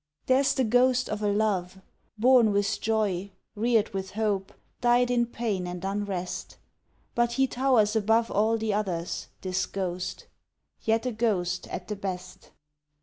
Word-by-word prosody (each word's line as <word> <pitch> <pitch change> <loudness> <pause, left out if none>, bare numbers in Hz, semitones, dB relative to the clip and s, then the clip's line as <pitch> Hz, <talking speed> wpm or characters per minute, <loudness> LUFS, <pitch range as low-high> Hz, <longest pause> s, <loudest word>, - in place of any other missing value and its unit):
There's 265 +1 +3
the 265 - +2
ghost 250 +2 +3
of 210 0 -3
a 210 - +1
Love, 200 -3 0 0.4
Born 240 -1 +5
with 205 +1 0
joy, 205 -4 0 0.2
reared 225 0 +2
with 190 0 -4
hope, 205 -3 0 0.3
died 245 0 +3
in 240 -1 +2
pain 215 -6 -2
and 180 +1 -5
unrest, 195 -3 -3 0.6
But 240 0 +1
he 270 +2 +3
towers 245 -5 +2
above 225 +2 +2
All 220 +3 +2
the 220 -1 -1
others 180 -5 -2
this 185 -1 -1
ghost: 185 -2 -4 0.6
yet 225 +1 +1
a 250 - 0
ghost 195 -6 -1
at - - -6
the 210 - -3
best. 185 -2 -6
215 Hz, 145 wpm, -27 LUFS, 190-235 Hz, 0.6 s, Born